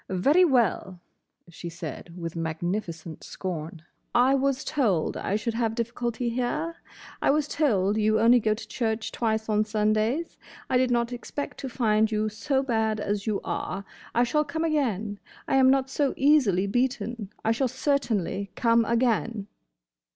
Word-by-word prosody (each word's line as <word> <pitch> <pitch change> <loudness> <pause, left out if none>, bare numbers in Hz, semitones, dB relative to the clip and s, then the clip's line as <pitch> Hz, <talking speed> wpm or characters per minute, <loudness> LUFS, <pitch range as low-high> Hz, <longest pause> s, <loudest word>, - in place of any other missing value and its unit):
"Very 280 - +4
well," 235 - +1 0.5
she 170 0 -8
said, 170 +1 -8
with 170 -1 -5
magnificent 165 0 -4
scorn. 165 -3 -6 0.3
"I 250 +3 +5
was 275 0 +1
told 220 - 0
I 200 - -2
should 225 +2 -1
have 225 -1 -1
difficulty 235 +1 -2
here. 255 +8 -2 0.5
I - - +2
was 295 +1 +2
told 210 -11 +1
you 215 0 +3
only 235 +2 +6
go 215 -1 +1
to 220 0 -9
church 220 0 -2
twice 220 -2 -1
on 215 -1 +2
Sundays. 215 +8 0 0.3
I 255 - +4
did 255 0 +2
not 240 0 +1
expect 265 +4 -6
to 270 - -4
find 220 -3 +2
you 215 0 0
so 265 +6 -1
bad 220 -4 0
as 205 0 -2
you 210 -2 0
are. 195 +2 -4 0.3
I 240 - +4
shall 300 +5 +2
come 320 +2 -3
again. 225 - -1 0.3
I - - +2
am 260 -1 +6
not 270 0 +3
so 275 +1 0
easily 260 -10 +4
beaten. 235 -1 -1 0.2
I 225 - +3
shall 255 +4 +1
certainly 230 - -1
come 230 -1 +3
again!" 230 -2 0
225 Hz, 160 wpm, -26 LUFS, 205-260 Hz, 0.5 s, only